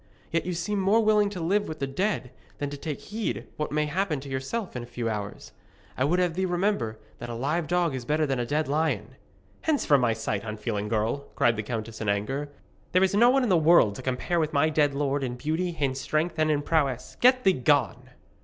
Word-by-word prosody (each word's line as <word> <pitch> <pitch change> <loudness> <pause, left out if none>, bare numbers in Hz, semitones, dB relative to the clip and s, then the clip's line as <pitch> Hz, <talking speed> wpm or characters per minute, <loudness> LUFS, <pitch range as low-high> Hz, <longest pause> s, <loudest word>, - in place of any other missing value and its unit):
Yet 165 +1 0
you 180 - -1
seem 185 +5 -2
more 195 +4 +3
willing 210 -1 +3
to 195 -3 -6
live 200 +5 +1
with 155 - -5
the 140 - -2
dead 135 - -2 0.3
than 145 -1 -3
to - - -4
take 150 -1 -5
heed 215 +1 -4
what 150 - -3
may 150 +1 +1
happen 160 -1 -1
to 140 - -9
yourself 135 - -3
in 125 - -3
a 120 - -9
few 120 -1 -4
hours. 105 -2 -5 0.4
I 130 - +1
would 170 +5 +2
have 180 -2 +1
thee 190 +2 -1
remember 175 - 0 0.2
that 120 - -6
a 120 - -4
live 150 +7 -1
dog 175 -2 +1
is 130 -2 -4
better 150 +5 +1
than 135 -3 -1
a - - +1
dead 150 +2 0
lion.' 140 -7 -1 0.5
'Hence 310 -3 +1
from 140 -3 +4
my 120 -2 +2
sight, 110 -2 -3
unfeeling 110 -1 -3
girl!' 115 +6 -1
cried 120 -1 +3
the 110 - -2
countess 110 0 -5
in 105 - -1
anger. 135 +9 -1 0.4
'There 185 +1 +5
is 190 - +2
no 235 +4 +6
one 265 +1 +3
in 245 - 0
the 180 - +5
world 160 -10 +5
to 115 - -8
compare 130 +7 -1
with 155 -1 -1
my 150 +2 +3
dead 145 -2 +2
lord 140 0 0
in 125 -2 -3
beauty, 160 +6 -2
in 135 -3 +1
strength, 155 +5 -1
and 155 0 +3
in 145 -1 +1
prowess. 140 -6 0
Get 255 +1 +5
thee 190 - +5
gone!' 130 -3 +1
145 Hz, 235 wpm, -27 LUFS, 125-175 Hz, 0.5 s, no